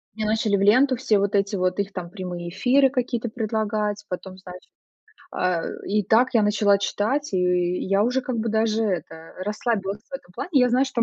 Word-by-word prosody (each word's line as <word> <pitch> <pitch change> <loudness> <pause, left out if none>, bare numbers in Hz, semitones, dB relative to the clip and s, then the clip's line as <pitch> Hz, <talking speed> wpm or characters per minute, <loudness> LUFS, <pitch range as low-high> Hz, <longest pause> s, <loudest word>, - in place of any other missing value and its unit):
мне 215 - -3
начали 215 -1 +1
в - - -2
ленту 255 +6 +4
все 225 -4 +1
вот 200 +1 0
эти 200 +1 +1
вот 185 +1 0
их 200 0 -1
там 175 -2 -6
прямые 180 -3 -6
эфиры 260 +9 +3
какие-то 245 -2 -2
предлагать. 215 -2 -2
Потом, 185 +1 -6
значит, 180 -1 -12 0.6
а, 180 -2 0 0.3
и 210 +1 +1
так 230 +6 +3
я 220 - +5
начала 205 -1 +3
читать, 225 +7 -1
и - - +2 0.5
я 195 +1 +2
уже 250 +3 +1
как 250 -2 -3
бы 225 +1 -1
даже 220 0 +1
это, 165 -4 -4
расслабилась 210 -1 -2
в - - -9
этом 180 -9 -9
плане. - - -5
Я 250 -3 +4
знаю, 255 +3 +3
что 235 -3 0
210 Hz, 195 wpm, -23 LUFS, 195-235 Hz, 0.6 s, я